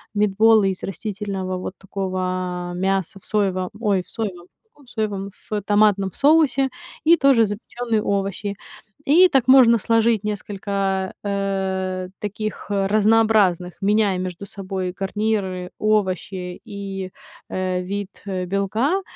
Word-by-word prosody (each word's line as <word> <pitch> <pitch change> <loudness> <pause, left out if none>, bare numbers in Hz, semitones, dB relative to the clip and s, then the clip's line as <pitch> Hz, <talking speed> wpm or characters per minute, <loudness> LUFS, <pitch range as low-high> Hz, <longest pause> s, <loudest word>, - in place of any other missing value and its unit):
митбола 210 +1 +4
из 190 -2 -1
растительного 195 -1 -4
вот 185 +1 -5
такого 185 -2 -3
мяса 190 0 -1
в - - -18
соевом 190 -3 0
ой, 205 -5 +1
в - - -23
соевом, 190 -6 -5 0.2
в 445 - -42
каком 285 - -23
соевом, 205 -4 -3 0.2
в 210 -1 -1
томатном 205 -2 +3
соусе 285 -3 +3 0.3
и 335 +2 +6
тоже 265 -5 +5
запечённые 220 +2 -2
овощи. 200 0 -2 0.5
И 345 +6 +7
так 270 -6 +1
можно 245 -3 +8
сложить 225 -1 +2
несколько, 195 -2 -2
э, 190 -2 -2
таких 210 +1 -5
разнообразных, 205 -3 +2
меняя 205 -1 +2
между 185 +1 -5
собой 190 -2 -4
гарниры, 195 -2 -2
овощи 190 -3 -1
и, 195 -2 -6 0.4
э, 185 -1 -1
вид 200 +1 -6
белка. 200 - 0
200 Hz, 120 wpm, -22 LUFS, 185-215 Hz, 0.5 s, можно